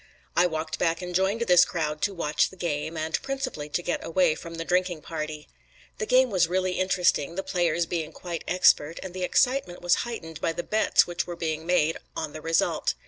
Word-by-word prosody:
I 175 Hz, +1 st, +5 dB
walked 160 Hz, -1 st, -4 dB
back 165 Hz, +1 st, 0 dB
and 180 Hz, 0 st, -5 dB
joined 190 Hz, +5 st, +1 dB
this 180 Hz, -6 st, +6 dB
crowd 150 Hz, -3 st, -2 dB
to 200 Hz, -, 0 dB
watch 150 Hz, -3 st, +1 dB
the -, -, -14 dB
game, 160 Hz, -2 st, -3 dB
and 160 Hz, +1 st, -1 dB
principally 270 Hz, -, -4 dB
to 175 Hz, -, -2 dB
get 175 Hz, -, -2 dB
away 170 Hz, -1 st, +2 dB
from 165 Hz, +2 st, -8 dB
the 165 Hz, 0 st, -5 dB
drinking 180 Hz, -3 st, 0 dB
party. 155 Hz, -2 st, -5 dB, 0.5 s
The 435 Hz, -, -2 dB
game 255 Hz, -, +4 dB
was 180 Hz, -3 st, +3 dB
really 185 Hz, +1 st, 0 dB
interesting, 180 Hz, -4 st, +1 dB
the 195 Hz, -, -2 dB
players 170 Hz, -2 st, +1 dB
being 165 Hz, -2 st, -3 dB
quite 170 Hz, -3 st, -6 dB
expert, 170 Hz, -3 st, +3 dB
and 190 Hz, -2 st, -7 dB
the 185 Hz, -, -6 dB
excitement 245 Hz, -4 st, +1 dB
was 175 Hz, -, +4 dB
heightened 165 Hz, -10 st, -6 dB
by 165 Hz, -, 0 dB
the 175 Hz, -, -4 dB
bets 215 Hz, +1 st, +3 dB
which 175 Hz, 0 st, -3 dB
were 175 Hz, -, -5 dB
being 160 Hz, -1 st, -3 dB
made 165 Hz, -3 st, +2 dB, 0.2 s
on 155 Hz, -2 st, -4 dB
the 155 Hz, -, -7 dB
result. 165 Hz, +1 st, +1 dB
175 Hz, 205 wpm, -26 LUFS, 160-185 Hz, 0.5 s, this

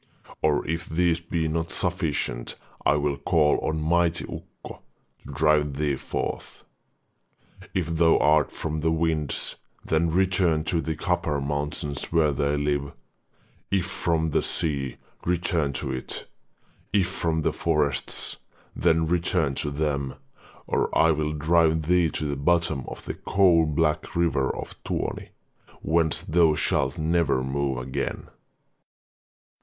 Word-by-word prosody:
Or 75 Hz, -2 st, +1 dB
if 80 Hz, +2 st, -3 dB
these 85 Hz, +1 st, +2 dB
be 85 Hz, -1 st, -2 dB
not 80 Hz, +1 st, -2 dB
sufficient, 80 Hz, -9 st, -2 dB, 0.3 s
I 70 Hz, -, +4 dB
will 75 Hz, -1 st, 0 dB
call 75 Hz, -2 st, +2 dB
on 80 Hz, -, -1 dB
mighty 85 Hz, +2 st, +2 dB
Ukko -, -, -10 dB, 0.4 s
to -, -, -10 dB
drive 75 Hz, -1 st, +2 dB
thee 75 Hz, -2 st, +1 dB
forth. -, -, -5 dB, 1.1 s
If 90 Hz, -, +1 dB
thou 80 Hz, 0 st, +5 dB
art 75 Hz, -1 st, +3 dB
from 80 Hz, -1 st, -3 dB
the 80 Hz, +1 st, +1 dB
winds, 80 Hz, -2 st, 0 dB, 0.3 s
then 80 Hz, +1 st, +2 dB
return 90 Hz, -2 st, +2 dB
to 85 Hz, 0 st, 0 dB
the 80 Hz, -1 st, -3 dB
copper 75 Hz, -1 st, 0 dB
mountains 70 Hz, 0 st, -2 dB
where 80 Hz, -3 st, +2 dB
they 70 Hz, +1 st, 0 dB
live; 70 Hz, -1 st, -1 dB, 0.8 s
if 95 Hz, -3 st, +1 dB
from 85 Hz, -4 st, 0 dB
the -, -, +2 dB
sea, 70 Hz, -5 st, -1 dB, 0.3 s
return 85 Hz, -4 st, 0 dB
to -, -, -2 dB
it; 65 Hz, -, -5 dB, 0.7 s
if 100 Hz, -4 st, +3 dB
from 80 Hz, -3 st, -1 dB
the -, -, +1 dB
forests, 75 Hz, -4 st, -1 dB, 0.4 s
then 80 Hz, 0 st, +3 dB
return 85 Hz, -3 st, +1 dB
to 75 Hz, -, -2 dB
them, 70 Hz, -2 st, -2 dB, 0.5 s
or -, -, 0 dB
I 80 Hz, -, +5 dB
will 75 Hz, 0 st, -1 dB
drive 80 Hz, +1 st, +3 dB
thee 85 Hz, +1 st, +3 dB
to 75 Hz, -, -3 dB
the 70 Hz, -1 st, -1 dB
bottom 80 Hz, -1 st, +1 dB
of -, -, -8 dB
the -, -, -3 dB
coal 90 Hz, -5 st, +3 dB
black 75 Hz, 0 st, 0 dB
river 80 Hz, -6 st, +2 dB
of -, -, -6 dB
Tuoni, -, -, -3 dB, 0.5 s
whence 80 Hz, -1 st, +1 dB
thou 85 Hz, -3 st, +3 dB
shalt 65 Hz, -2 st, +1 dB
never 80 Hz, -4 st, +1 dB
move 70 Hz, 0 st, -1 dB
again.' 65 Hz, +1 st, -4 dB
80 Hz, 135 wpm, -25 LUFS, 75-85 Hz, 1.1 s, thou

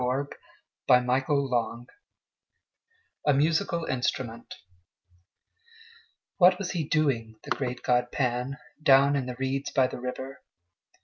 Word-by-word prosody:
Elizabeth 135 Hz, +3 st, -2 dB, 0.5 s
Barrett 125 Hz, +1 st, +3 dB
Browning 120 Hz, -5 st, 0 dB, 1.4 s
A 145 Hz, -, +5 dB
Musical 165 Hz, +3 st, +1 dB
Instrument 120 Hz, -2 st, -3 dB, 1.8 s
WHAT 180 Hz, 0 st, +6 dB
was 190 Hz, -2 st, -4 dB
he 170 Hz, -4 st, -1 dB
doing, 135 Hz, -8 st, 0 dB
the -, -, -10 dB
great 125 Hz, -2 st, -2 dB
god 125 Hz, 0 st, +1 dB
Pan, 125 Hz, 0 st, -1 dB, 0.2 s
Down 140 Hz, 0 st, +5 dB
in 135 Hz, -3 st, -1 dB
the 125 Hz, -, -5 dB
reeds 135 Hz, +2 st, -2 dB
by 130 Hz, -, +3 dB
the 125 Hz, -, -5 dB
river? 130 Hz, +2 st, -6 dB
130 Hz, 115 wpm, -27 LUFS, 125-140 Hz, 1.8 s, WHAT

